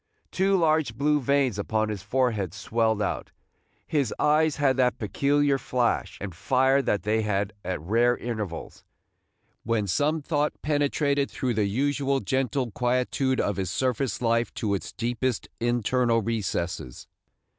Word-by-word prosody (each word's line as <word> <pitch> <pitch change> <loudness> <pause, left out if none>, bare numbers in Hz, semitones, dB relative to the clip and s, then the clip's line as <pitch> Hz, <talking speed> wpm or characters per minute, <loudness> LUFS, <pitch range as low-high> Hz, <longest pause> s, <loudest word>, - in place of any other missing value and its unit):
Two 195 +1 +2
large 155 -8 +2
blue 150 +3 +2
veins 135 -5 +1
upon 110 +1 0
his 105 -3 -4
forehead 110 -7 0
swelled 110 -1 0
out, - - -3 0.6
his 140 -7 0
eyes 155 0 +3
had 140 -3 +2
that 125 -1 +2
peculiar 140 +5 +1
flash 125 -2 -1
and 95 -2 -5
fire 130 +8 +2
that 105 -8 0
they 110 +2 +1
had 105 -1 -1
at 90 -2 -3
rare 115 +9 +2
intervals, 105 -8 -5 0.8
when 115 -2 0
some 145 - +1
thought 150 0 -1
penetrated 145 -1 +1
through 125 -2 -2
the 105 -2 +1
usual 140 +5 0
gentle 130 +2 -1
quietude 125 +3 0
of 100 - 0
his 95 -3 -2
surface 130 +4 -1
life 115 0 +1
to 105 -3 -1
its 100 - -3
deepest 120 0 -2
internal 120 0 +1
recesses. 100 - -3
120 Hz, 140 wpm, -26 LUFS, 105-140 Hz, 0.8 s, eyes